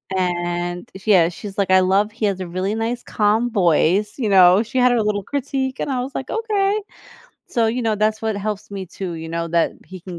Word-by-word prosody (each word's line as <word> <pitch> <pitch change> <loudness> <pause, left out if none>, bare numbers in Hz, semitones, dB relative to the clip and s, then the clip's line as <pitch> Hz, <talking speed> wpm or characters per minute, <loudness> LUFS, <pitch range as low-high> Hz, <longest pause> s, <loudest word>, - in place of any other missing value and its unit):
and 175 -1 -2 0.2
yeah, 190 -6 +5
she's 195 +3 -9
like, 195 -2 0
"I 185 0 +6
love 195 +3 +2
he 220 0 -3
has 195 -2 0
a 185 - -4
really 185 +4 -2
nice 230 +2 -2
calm 215 +3 +1
voice," 195 +1 +2
you 225 -5 0
know, 185 +1 +6
she 235 +3 -6
had 250 0 +5
her 235 - +2
little 205 -1 -1
critique, 270 +1 -3
and - - -2
I 255 - -1
was 265 +3 -6
like, 265 - -4
"Okay," 425 -2 0 0.7
so 230 -3 +1
you 240 +3 -1
know, 220 -2 0
that's 215 +1 0
what 220 -2 -1
helps 205 0 -4
me 195 -2 -6
to, 180 0 -6
you 160 0 -7
know, 170 0 -3
that 170 0 +1
he 185 - -9
can 175 -1 -8
205 Hz, 225 wpm, -20 LUFS, 185-230 Hz, 0.7 s, I